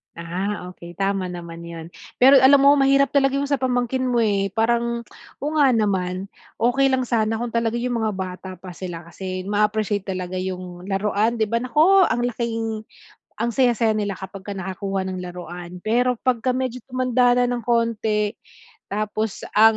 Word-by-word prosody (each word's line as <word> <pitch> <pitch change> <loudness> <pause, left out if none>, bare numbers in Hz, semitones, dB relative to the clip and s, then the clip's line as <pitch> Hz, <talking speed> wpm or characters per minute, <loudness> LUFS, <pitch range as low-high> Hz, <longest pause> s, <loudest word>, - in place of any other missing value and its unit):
Ah, 180 +3 -4
okey, 175 -1 -12
tama 195 0 -1
naman 170 -2 -8
yun. 165 -1 -8 0.3
Pero 270 +2 +7
alam 270 +2 +7
mo 280 +1 +8
mahirap 275 0 +4
talaga 275 -1 +3
yung 280 0 -1
sa 280 - +1
pamangkin 255 0 0
mo 240 -2 +2
eh, 200 -2 +1
parang, 235 +1 +1 0.4
oo 295 - -1
nga 280 - +6
naman, 190 -3 0 0.3
okey 245 +4 +3
lang 260 -1 +1
sana 225 -2 0
kung 240 0 -4
talaga 230 0 0
yung 245 -1 -1
mga 215 -1 0
bata 185 0 -6
pa 185 +1 -10
sila 175 -2 -7
kasi, 185 +2 -6
maa-appreciate 210 0 0
talaga 185 -1 -3
yung 185 0 -6
laruan 210 +3 +1
'di 220 - +1
ba? 230 - +1
Nako, 335 +8 +5
ang 240 - 0
laking 225 -2 -2 0.6
ang 235 - +1
saya-saya 235 -3 +2
nila 205 -1 -1
kapag 190 +1 -9
ka 205 - -4
nakakuha 190 +1 -3
ng 185 - -4
laruan. 180 0 -8
Pero, 245 +3 +2
pag 255 -2 +2
ka 255 - +3
medyo 255 -1 -2
tumanda 255 -1 +2
na 245 - +2
ng 245 -1 -2
konti, 220 -2 0 0.5
tapos 215 0 -3
ang 220 +1 +6
220 Hz, 175 wpm, -22 LUFS, 190-245 Hz, 0.6 s, mo